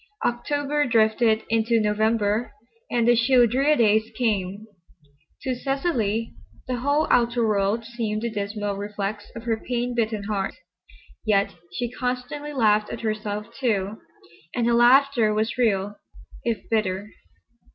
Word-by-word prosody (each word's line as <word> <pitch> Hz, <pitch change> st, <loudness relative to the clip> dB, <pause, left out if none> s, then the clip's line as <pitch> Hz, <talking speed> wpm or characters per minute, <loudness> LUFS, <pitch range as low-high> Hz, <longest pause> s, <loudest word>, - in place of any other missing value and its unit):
October 290 Hz, +4 st, 0 dB
drifted 220 Hz, -1 st, +3 dB
into 230 Hz, +1 st, +2 dB
November 215 Hz, +1 st, +1 dB, 0.4 s
and 235 Hz, -1 st, +1 dB
the 240 Hz, -, +6 dB
chill, 245 Hz, +1 st, +5 dB
drear 270 Hz, +6 st, +2 dB
days 220 Hz, -4 st, +4 dB, 0.2 s
came. 205 Hz, -3 st, -1 dB, 0.8 s
To 260 Hz, -, -1 dB
Cecily 245 Hz, -, -1 dB, 0.3 s
the 250 Hz, -1 st, -1 dB
whole 285 Hz, +5 st, +1 dB
outer 235 Hz, -1 st, +3 dB
world 210 Hz, +2 st, +1 dB
seemed 225 Hz, -2 st, -3 dB
the 235 Hz, -, -1 dB
dismal 205 Hz, -1 st, -3 dB
reflex 205 Hz, 0 st, -4 dB
of 230 Hz, -, -7 dB
her 230 Hz, -2 st, 0 dB
pain 245 Hz, 0 st, -2 dB
bitten 220 Hz, -3 st, -1 dB
heart. 200 Hz, -2 st, -2 dB, 0.7 s
Yet 200 Hz, -2 st, +2 dB, 0.2 s
she 240 Hz, +5 st, -3 dB
constantly 250 Hz, +4 st, -4 dB
laughed 215 Hz, -6 st, +2 dB
at -, -, -6 dB
herself, 215 Hz, 0 st, -3 dB
too, 215 Hz, -5 st, -1 dB, 0.6 s
and 240 Hz, -, +1 dB
her 235 Hz, -, +3 dB
laughter 240 Hz, -2 st, +5 dB
was 220 Hz, +2 st, 0 dB
real 205 Hz, -3 st, +1 dB, 0.5 s
if 230 Hz, -2 st, -2 dB
bitter. 205 Hz, -1 st, -1 dB
225 Hz, 130 wpm, -24 LUFS, 210-245 Hz, 0.8 s, the